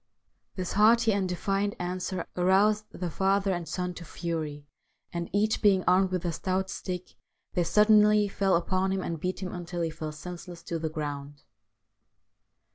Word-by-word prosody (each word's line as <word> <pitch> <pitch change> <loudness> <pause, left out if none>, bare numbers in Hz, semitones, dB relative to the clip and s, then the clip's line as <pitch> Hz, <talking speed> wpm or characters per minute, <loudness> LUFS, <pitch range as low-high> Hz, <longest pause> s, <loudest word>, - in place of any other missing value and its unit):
This 185 -2 -3
haughty 225 +2 +5
and 195 -2 0
defiant 195 +3 -1
answer 180 +1 -3
aroused 200 +4 +3
the 175 -2 -5
father 195 +2 +2
and 175 -2 -4
son 180 -1 -3
to 175 - -9
fury, 155 -3 -4 0.5
and, 170 0 -3
each 215 +2 +1
being 195 -3 +4
armed 185 +1 +4
with 185 -1 -2
a 170 - +1
stout 190 +3 -1
stick, 180 -2 -5 0.4
they 175 - +2
suddenly 210 +3 +5
fell 195 -1 +1
upon 185 +2 +1
him 190 -1 -1
and 165 -2 -3
beat 185 +3 -3
him 180 - -4
until 175 -1 -5
he 165 -1 -1
fell 155 -1 -5
senseless 175 +2 -9
to 170 -1 -3
the 160 0 -2
ground. 145 -2 -5
185 Hz, 165 wpm, -28 LUFS, 170-195 Hz, 0.5 s, haughty